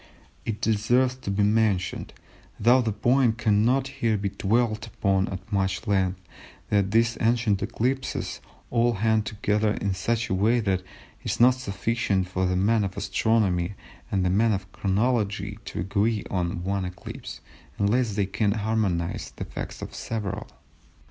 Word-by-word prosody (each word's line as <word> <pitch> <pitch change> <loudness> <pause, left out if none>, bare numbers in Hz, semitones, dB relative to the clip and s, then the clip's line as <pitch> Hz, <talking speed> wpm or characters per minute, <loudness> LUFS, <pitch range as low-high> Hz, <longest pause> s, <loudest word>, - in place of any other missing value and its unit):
It 110 -2 -3
deserves 120 +4 +2
to 130 - -6
be 100 +1 +1
mentioned, 105 -4 +1 0.5
though 120 +4 +5
the 115 -2 0
point 120 +1 +2
cannot 120 +5 +2
here 120 -6 0
be 100 0 -1
dwelt 110 +2 0
upon 95 -2 +1
at 95 +3 -7
much 95 0 0
length, 95 -3 +1 0.5
that 100 -2 +3
these 115 +3 +2
ancient 115 -3 +2
eclipses 130 +3 -2 0.3
all 120 0 +3
hang 110 +1 +2
together 105 0 0
in 100 -1 -1
such 115 +5 -1
a 110 - -1
way 110 +6 +3
that 95 -5 +1
it 90 - -20 0.4
is - - -2
not 125 +2 +7
sufficient 105 -4 -1
for 95 0 0
the 90 - 0
man 105 +4 +3
of 95 -1 -4
Astronomy 100 -3 +1 0.4
and 95 -2 +1
the 90 - +2
man 110 +3 +3
of 95 -1 -4
Chronology 105 -1 0
to - - -4
agree 105 +4 0
on 90 -2 -1
one 100 +1 -1
eclipse, 90 -8 -7 0.4
unless 105 +1 +1
they 100 -2 +1
can 105 +1 0
harmonise 105 -6 -1
the - - -5
facts - - -6
of - - -7
several. 105 -2 -4
105 Hz, 155 wpm, -26 LUFS, 95-115 Hz, 0.5 s, not